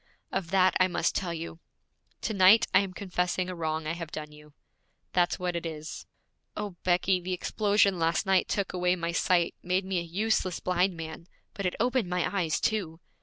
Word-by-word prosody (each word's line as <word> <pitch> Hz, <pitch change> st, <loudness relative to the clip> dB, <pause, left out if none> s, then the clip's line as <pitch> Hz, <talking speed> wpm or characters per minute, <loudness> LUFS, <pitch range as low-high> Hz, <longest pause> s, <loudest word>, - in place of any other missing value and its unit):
Of 170 Hz, -, -2 dB
that 185 Hz, 0 st, +4 dB
I 185 Hz, -, +5 dB
must 175 Hz, -2 st, 0 dB
tell 180 Hz, -3 st, -2 dB
you. 165 Hz, 0 st, -6 dB, 0.6 s
To 220 Hz, -, -2 dB
night 200 Hz, +4 st, +7 dB
I 185 Hz, -, +7 dB
am 195 Hz, -2 st, -2 dB
confessing 180 Hz, -1 st, -2 dB
a 185 Hz, -, -4 dB
wrong 160 Hz, -1 st, -2 dB
I 155 Hz, -, -1 dB
have 170 Hz, -2 st, -6 dB
done 150 Hz, -1 st, -6 dB
you. 150 Hz, 0 st, -16 dB, 0.6 s
That's 175 Hz, -1 st, +2 dB
what 180 Hz, -1 st, -2 dB
it 170 Hz, -, -2 dB
is. 155 Hz, -1 st, -6 dB, 0.5 s
O, 210 Hz, -1 st, -3 dB
Becky, 180 Hz, +1 st, +2 dB
the 185 Hz, +1 st, -3 dB
explosion 200 Hz, 0 st, +2 dB
last 165 Hz, +1 st, +1 dB
night 190 Hz, -1 st, +3 dB
took 200 Hz, -3 st, -1 dB
away 180 Hz, 0 st, +2 dB
my 170 Hz, -1 st, -2 dB
sight, 175 Hz, 0 st, +2 dB
made 185 Hz, +2 st, 0 dB
me 190 Hz, -2 st, 0 dB
a -, -, -2 dB
useless 185 Hz, +1 st, 0 dB
blind 180 Hz, 0 st, +1 dB
man, 160 Hz, +1 st, -7 dB, 0.3 s
but 200 Hz, -2 st, -2 dB
it 180 Hz, -, -3 dB
opened 245 Hz, -4 st, +1 dB
my 180 Hz, -1 st, 0 dB
eyes 170 Hz, -5 st, +1 dB
too! 180 Hz, -7 st, -1 dB
180 Hz, 195 wpm, -28 LUFS, 170-190 Hz, 0.6 s, night